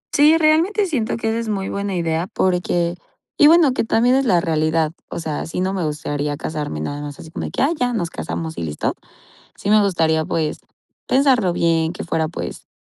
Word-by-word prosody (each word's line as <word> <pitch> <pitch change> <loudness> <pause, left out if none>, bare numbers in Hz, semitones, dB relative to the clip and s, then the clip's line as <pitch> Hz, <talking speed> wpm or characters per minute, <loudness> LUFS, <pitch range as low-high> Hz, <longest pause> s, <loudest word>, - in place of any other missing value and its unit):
Sí, 300 +2 +6
realmente 330 +7 +3
siento 260 - -1
que 225 -1 -1
esa 225 +1 -1
es 230 -1 -4
muy 195 -2 -2
buena 200 -1 -3
idea 165 0 -1
porque 175 -4 0 0.4
y 295 - +6
bueno, 325 -3 +6
que - - 0
también 235 +2 +3
es 270 +1 +2
la 180 -7 +3
realidad, 155 -1 +1 0.2
o - - -5
sea, 155 -3 -3
sí 165 - -4
no 190 +1 0
me 190 -3 -2
gustaría 145 -1 -3
casarme 150 - -4
nada 145 - -4
más 145 -1 -7
así 160 - -11
como - - -4
de - - -4
que: - - 0
"Ah, 280 - +3
ya 250 -4 0
nos 175 -7 -2
casamos 160 0 -5
y - - -3
listo", 75 -2 -2 0.6
sí - - -6
me 210 0 +5
gustaría, 160 -5 +1
pues, 155 -2 -2 0.5
pensarlo 255 -9 +3
bien, 165 -1 +1
que 180 - -6
fuera, 160 -2 0
pues, 170 - -7
175 Hz, 210 wpm, -20 LUFS, 160-235 Hz, 0.6 s, Sí